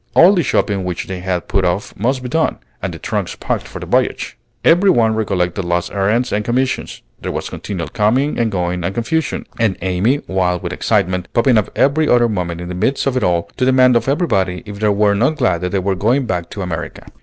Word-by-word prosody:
All 180 +4 +7
the 180 - +2
shopping 100 - 0
which 90 -2 -3
they 95 -1 -5
had 90 -1 -2
put 100 -1 +1
off 90 +3 -1
must 125 +5 -1
be 125 - -4
done, 160 +4 +1 0.2
and - - -2
the - - -7
trunks - - -3
packed - - -2
for - - -9
the - - -6
voyage. - - 0 0.3
Every 175 +4 +5
one 115 -9 +3
recollected 95 -4 -1
last 85 0 -1
errands 105 +5 +1
and 105 +1 0
commissions; 130 +3 -2 0.2
there - - -3
was - - -4
continual 90 -5 -5
coming 120 +6 +1
and 115 -2 +1
going 90 -2 -2
and 95 +3 -2
confusion, 160 +6 -1
and 110 -4 +1
Amy, 95 +10 +1
wild 90 -2 0
with 85 - -3
excitement, 90 -4 0
popping 120 +1 +3
up 105 - -3
every 145 +3 +2
other 120 -1 +5
moment 90 -5 -3
in 90 - -6
the - - -4
midst 110 +10 0
of 135 -2 0
it 130 - +1
all, 85 -2 +2
to 130 - 0
demand 130 -1 +5
of 120 - +1
everybody 100 - 0
if 100 -1 -8
they 105 0 +2
were 105 0 +3
not 125 +10 +2
glad 120 - +1
that 90 - -1
they 100 - 0
were 95 +1 0
going 120 +8 +1
back 90 -6 -3
to 100 - -5
America. 85 -3 -5
105 Hz, 225 wpm, -18 LUFS, 90-125 Hz, 0.3 s, All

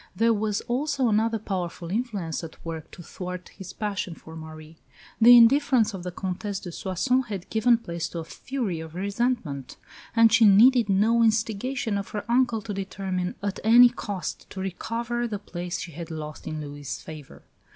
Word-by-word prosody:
There 230 +3 +3
was 210 -1 -1
also 270 0 0
another 225 +1 +2
powerful 180 -4 -4
influence 200 -8 -2
at 165 - -11
work 160 -2 -6
to 175 - -12
thwart 180 +2 -7
his 190 -1 -10
passion 200 -5 -3
for 160 0 -12
Marie. 155 0 -10 0.4
The 240 +2 +10
indifference 245 -2 +5
of 190 - -6
the 180 - -4
Comtesse 190 +2 -4
de 180 - -8
Soissons 250 +10 0
had 195 -4 -5
given 230 +2 +4
place 170 -7 -5
to - - -7
a 165 - -3
fury 205 +1 -4
of 160 0 -9
resentment; 200 - -2 0.4
and 230 -1 +6
she 235 -1 +6
needed 225 +3 +6
no 220 +4 +3
instigation 225 +1 0
of 200 - -6
her 210 -2 -5
uncle 235 -2 +2
to 220 -2 -5
determine 190 -2 -3
at 200 -1 -2
any 240 +3 +8
cost 200 -8 -5
to 190 - -8
recover 230 +6 -3
the 210 -3 -3
place 180 -2 -5
she 170 - -6
had 165 +2 -8
lost 155 -2 -7
in 155 0 -4
Louis' 145 -1 -6
favour. 155 -3 -11
200 Hz, 175 wpm, -26 LUFS, 175-230 Hz, 0.4 s, The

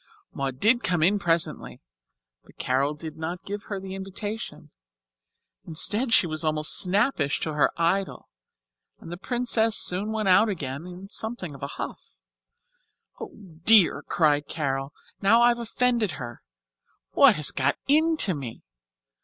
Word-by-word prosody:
Maud 135 -2 -4
did 230 - +3
come 175 -8 0
in 200 +5 +3
presently, 170 -3 -2 0.6
but - - -22
Carol 135 +4 -1
did 155 +1 -9
not 170 +3 -6
give 205 +1 -6
her 200 -2 -5
the 190 0 -8
invitation. 200 +3 -7 1.0
Instead, 210 +10 +1
she 210 - +5
was 155 -1 -3
almost 155 -1 +1
snappish 190 - +1
to 155 - -3
her 150 - +2
idol, 185 +3 -1 0.7
and 165 - -11
the 175 - -6
Princess 225 +2 +1
soon 195 +4 +1
went 220 -2 -2
out 195 +4 +4
again 145 -3 -5
in 180 +2 -10
something 220 -6 -4
of 135 - -13
a 140 - -4
huff. - - -8 1.1
"Oh, - - -9 0.3
dear," 210 -3 +6
cried 150 -3 0
Carol, 135 -3 -3 0.3
"now 225 +4 +4
I've 240 0 +3
offended 235 -3 0
her. 120 -2 -9 0.7
What - - +5
has 150 -2 +2
got 135 +2 -1
into 310 - +3
me? 135 -7 -8
185 Hz, 145 wpm, -25 LUFS, 155-220 Hz, 1.1 s, dear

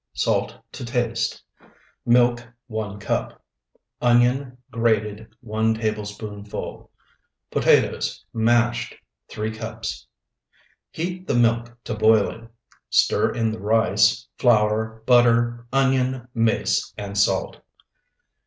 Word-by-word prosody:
Salt - - 0 0.2
to - - -8
taste. 120 -1 -2 0.6
Milk, 120 0 +3 0.2
1 110 -3 -5
cup. 105 - -3 0.6
Onion 125 +2 +2
grated, 110 -2 0
1 110 0 0
tablespoonful. 105 -1 -5 0.6
Potatoes, - - +2
mashed, 120 +1 +1 0.3
3 110 +1 -3
cups. 110 - -6 0.8
Heat 180 +3 -5
the 135 - 0
milk 120 0 +1
to 120 - -4
boiling, 110 +1 +2 0.4
stir - - +3
in 115 -2 0
the 110 - -6
rice, 110 +2 +2
flour, 110 -1 +2
butter, 120 -1 +3
onion, 130 -2 +1
mace, 115 -2 0
and 100 -1 -6
salt. 100 0 +1
115 Hz, 95 wpm, -23 LUFS, 110-120 Hz, 0.8 s, Milk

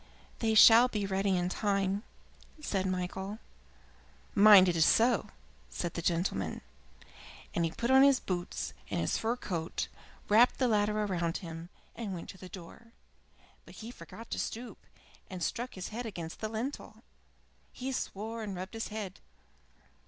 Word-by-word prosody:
"They 220 -1 +1
shall 230 +3 +9
be 210 -5 -2
ready 195 +1 0
in 175 0 0
good - - -5
time," 200 -1 0 0.6
said 195 -10 -1
Michael. 190 +2 -3 1.0
"Mind 200 -2 +8
it 175 - +1
is 160 - +4
so," 235 +9 +3 0.4
said 170 -2 -4
the 170 - -3
gentleman, 170 +2 -1 0.9
and 170 - +1
he - - 0
put 235 +9 -2
on 265 0 +7
his 275 -1 +6
boots 175 -2 -4 0.2
and - - -1
his - - 0
fur 225 +2 0
coat, 170 -8 -3 0.4
wrapped 230 +4 +5
the 255 - +2
latter 210 -1 +1
round 175 -4 -1
him, 165 -2 -8 0.3
and 210 -5 -4
went 170 - -8
to 190 - -10
the 185 - -10
door. 190 +6 -12 0.7
But - - -15
he 225 +2 -8
forgot 200 +3 -12
to - - -2
stoop, 240 +2 -6 0.4
and 185 -2 -5
struck 240 +10 -3
his 185 -1 -5
head 235 +2 -5
against 170 -6 -7
the 215 - -3
lintel. 230 +6 -5 0.7
He 260 +1 -5
swore 225 -2 -4
and 205 -3 -5
rubbed 185 +4 -6
his 225 0 -4
head. 210 -3 -6
200 Hz, 160 wpm, -31 LUFS, 180-225 Hz, 1.0 s, shall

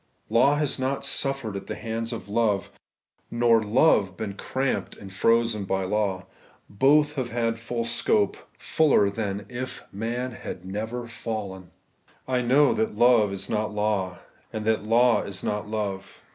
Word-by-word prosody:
Law 135 +5 +5
has 145 -2 -1
not 135 +1 -1
suffered 135 -6 0
at 100 - -6
the - - -4
hands 115 +1 -4
of 115 - -6
love, 105 -2 0 0.6
nor 115 -1 +3
love 105 - +3
been 105 -2 -4
cramped 130 +6 -2
and 95 -1 -11
frozen 115 +1 +2
by 95 0 -1
law. 95 -1 -1 0.4
Both 145 +7 +3
have 130 -5 -3
had 115 -1 -1
full 115 +1 -3
scope, 110 -3 +1 0.2
fuller 145 -10 +3
scope 100 - -10
than 100 -2 -3
if 130 +1 -6
man 120 +5 -3
had 95 -5 -8
never 110 +5 -4
fallen. 105 -5 -6 0.6
I 130 -1 +1
know 135 +4 +4
that 220 0 -1
love 120 -4 +4
is 100 0 -3
not 105 -1 -2
law, 105 -4 -1 0.3
and 110 -2 -4
that 110 -2 +1
law 115 +2 +4
is 95 -1 -6
not 105 0 -2
love. 100 -3 -4
110 Hz, 160 wpm, -25 LUFS, 100-125 Hz, 0.6 s, Law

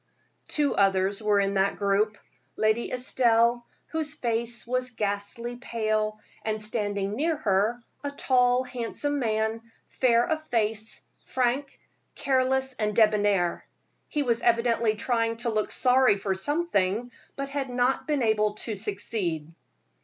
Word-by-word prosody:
Two 295 -2 +1
others 195 +1 +2
were 210 -1 +3
in 200 0 +1
that 195 0 +2
group 205 +1 +1 0.4
Lady 220 +2 +1
Estelle, 240 -1 +2 0.2
whose 315 -2 -3
face 235 -2 -2
was 255 +1 -1
ghastly 225 +2 -3
pale; 215 -3 -1 0.2
and 215 0 -1
standing 205 -2 -2
near 315 +5 0
her, 220 -1 +1 0.2
a 285 - -1
tall, 255 -3 +2
handsome 255 +4 -3
man, 220 -1 0 0.3
fair 235 -2 +3
of 315 -1 -1
face, 220 -1 -1 0.2
frank, 260 +2 -1 0.4
careless 265 0 +1
and 210 -1 0
debonair. 205 -5 +3 0.5
He 295 - 0
was 235 -3 +1
evidently 230 -2 +2
trying 230 0 0
to 235 0 -2
look 215 -1 -1
sorry 255 -4 +4
for 195 0 -1
something, 240 - 0 0.2
but 275 0 -4
had 275 -2 -3
not 250 +3 0
been 295 -4 +1
able 215 -2 +2
to 215 0 -4
succeed. 190 -6 -3
230 Hz, 130 wpm, -27 LUFS, 210-255 Hz, 0.5 s, sorry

